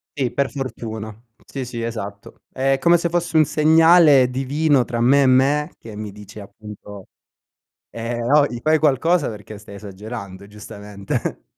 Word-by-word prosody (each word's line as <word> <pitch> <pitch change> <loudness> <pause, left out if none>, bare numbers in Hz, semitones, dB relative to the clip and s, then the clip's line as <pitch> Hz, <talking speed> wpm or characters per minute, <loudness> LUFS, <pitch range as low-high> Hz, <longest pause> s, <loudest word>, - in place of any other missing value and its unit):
Sì, 130 -4 -2
per 140 +2 -1
fortuna. 110 -5 -6 0.3
Sì, 135 -2 -6
sì, 120 -1 -6
esatto. 100 -3 -7
È 135 +1 0
come 170 +5 +4
se 170 - -1
fosse 170 -1 -2
un 155 - +6
segnale 155 -2 +5
divino 135 +1 +1
tra 115 -1 -4
me 140 +4 +4
e - - +3
me, 140 +5 +2
che 110 -2 -11
mi 105 -1 -7
dice 105 +1 -12
appunto: 105 -1 -12 0.8
ehm, 115 +1 -5
"Ohi, 135 -1 +2
fai 155 0 +3
qualcosa 155 +3 +1
perché 105 -1 -9
stai 105 -1 -13
esagerando”, 100 -1 -9
giustamente. 105 -1 -6
120 Hz, 150 wpm, -20 LUFS, 105-145 Hz, 0.8 s, un